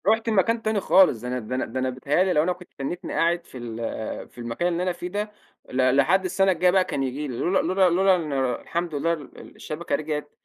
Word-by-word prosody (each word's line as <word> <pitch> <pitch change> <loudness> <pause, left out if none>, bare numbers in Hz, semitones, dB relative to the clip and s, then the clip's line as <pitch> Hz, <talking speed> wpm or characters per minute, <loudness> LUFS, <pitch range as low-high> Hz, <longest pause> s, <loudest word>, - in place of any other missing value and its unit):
رُحت 225 +2 +3
لمكان 225 +2 +2
تاني 220 -1 0
خالص، 185 - +4
ده 125 - -5
أنا 125 +1 -2
ده 120 +2 -5
أنا 130 - -1
ده 130 +3 -4
أنا 130 0 0
بيتيهأ 140 +7 +1
لي 185 -1 +1
لو 150 - +3
أنا 180 +2 +1
كنت 180 0 -15
تنّيتني 140 +6 -4
قاعد 170 +1 +1
في - - -11
ال 115 -2 -5
في - - -26
المكان 120 +8 -2
اللي 175 0 0
أنا 185 - +1
فيه 175 0 -6
ده 205 +3 -3 0.4
ل 130 0 +2
لحد 175 +8 +3
السنة 195 +1 +2
الجايّة 180 0 +3
بقى 190 0 +4
كان 135 - -2
ييجي 135 +3 -3
لي 125 -3 -5
لولا 190 +7 +1
لولا 185 -1 +3
لولا 190 +2 +4
إن 160 -5 -3 0.3
الحمد 170 -2 -3
لله 165 +4 +1
ال 150 -4 -10
الشبكة 155 -1 -3
رجعت 150 -1 -4
170 Hz, 240 wpm, -24 LUFS, 135-185 Hz, 0.4 s, خالص